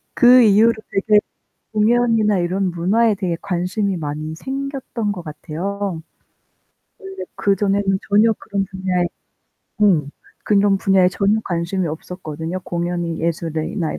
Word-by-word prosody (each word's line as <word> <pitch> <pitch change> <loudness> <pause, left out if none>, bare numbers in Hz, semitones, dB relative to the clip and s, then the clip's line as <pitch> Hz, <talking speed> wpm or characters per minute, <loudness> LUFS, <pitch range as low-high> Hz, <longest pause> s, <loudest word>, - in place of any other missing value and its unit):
그 250 0 +7
이후로 220 +2 +5 0.2
되게 210 +2 +3 0.5
공연이나 220 -2 +2
이런 185 +2 0
문화에 205 +6 +2
대해 185 -4 -2
관심이 190 +1 -1
많이 155 0 -4
생겼던 265 - -4
것 180 -3 -7
같아요. 170 +4 -5 1.0
원래 385 0 -8
그 200 -1 +1
전에는 195 -1 +1
전혀 215 +2 +4
그런 200 -1 -2
분야에 185 -2 -1 0.8
음, 160 -9 +3 0.3
그런 200 -1 +3
분야에 190 -2 +4
전혀 200 +3 +1
관심이 175 +1 -2
없었거든요. 160 +1 -6
공연이 170 -1 -3
예술이나 165 0 -2
이러 - - -6
195 Hz, 290 characters per minute, -20 LUFS, 170-210 Hz, 1.0 s, 그